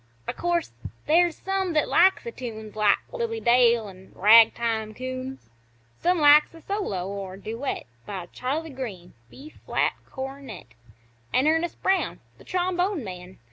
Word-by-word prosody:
O' - - -2
course, 345 -1 -1 0.3
there's 340 +1 +3
some 385 -2 -2
that 305 -2 +2
likes 380 +2 +4
the 470 - -5
tunes 220 - -8
Like 210 -1 +4
Lily 465 -2 -3
Dale 235 - +4
an' 190 -1 -14
Ragtime 220 +1 +4
Coons; 255 - -6 0.5
Some 360 +1 +2
likes 300 +1 +6
a 330 - -13
solo 210 - -3
or 195 -1 -6
duet 230 +7 -4 0.2
By 190 -4 -5
Charley 300 +5 -3
Green 210 -10 -7 0.2
B 290 - -12 0.2
flat - - +1 0.2
cornet 265 - -8 0.6
An' 260 - +2
Ernest 325 +2 0
Brown 380 0 +1 0.2
th' - - -17
trombone 365 -2 0
man. 180 -2 -9
260 Hz, 140 wpm, -25 LUFS, 215-345 Hz, 0.6 s, likes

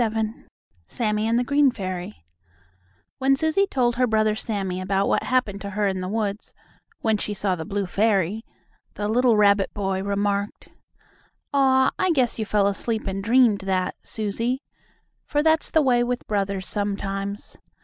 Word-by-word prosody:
XXVII 220 0 -2 0.4
SAMMIE 215 -1 -1
AND 230 +1 +2
THE 245 - +2
GREEN 280 +2 +3
FAIRY 185 - -6 0.9
When 270 0 +3
Susie 315 +7 +1
told 240 -6 0
her 250 0 +3
brother 215 -1 +2
Sammie 195 -4 -3
about 195 +1 0
what - - +2
happened 230 -6 0
to 200 - -5
her 205 +1 -1
in 190 -2 -1
the 185 - -3
woods, 210 0 -3 0.5
when 220 -2 +2
she 210 - -4
saw 195 -2 0
the 160 -2 -6
blue 200 +2 -2
fairy, 200 +1 +1 0.5
the 205 - -2
little 235 +1 +3
rabbit 200 -1 +4
boy 195 -2 -1
remarked: 200 +1 -2 0.8
"Aw, 265 -1 +4
I 370 - +2
guess 250 -6 +1
you 220 - -1
fell 205 -1 +2
asleep 215 +3 -1
and 195 0 -3
dreamed 230 -2 +4
that, 190 -1 -1
Susie." 230 +5 -3 0.6
for 295 0 0
that's 320 0 +2
the 315 - +3
way 245 -3 +3
with 245 0 -3
brothers 200 -2 -2
sometimes. 200 -1 -3
210 Hz, 160 wpm, -24 LUFS, 195-245 Hz, 0.9 s, rabbit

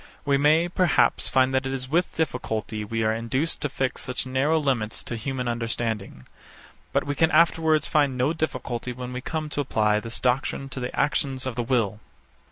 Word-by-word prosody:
We 140 -1 +3
may, 155 +4 +4
perhaps, 175 -1 +3
find 130 0 +3
that 130 0 +1
it - - -3
is 130 -1 -3
with 170 +6 0
difficulty 110 -8 -2
we 115 +2 -2
are 110 0 +2
induced 130 +8 -2
to 145 - -1
fix 130 -1 -2
such 130 0 -2
narrow 135 +5 +1
limits 130 -8 -1
to 120 - -4
human 125 +2 -3
understanding: 115 - -3 0.7
But - - +1
we 145 - -2
can 160 +3 +3
afterwards 160 -1 +3
find 145 -4 +2
no 130 +5 +2
difficulty 130 -6 -3
when 125 0 -6
we 125 - -4
come 155 +3 -3
to 145 - -1
apply 105 -5 +2
this 115 +1 -4
doctrine 130 +2 0
to 135 - -6
the 125 0 -4
actions 135 -3 0
of 130 -3 -3
the 125 - -1
will. 115 -4 0
130 Hz, 190 wpm, -25 LUFS, 115-145 Hz, 0.7 s, may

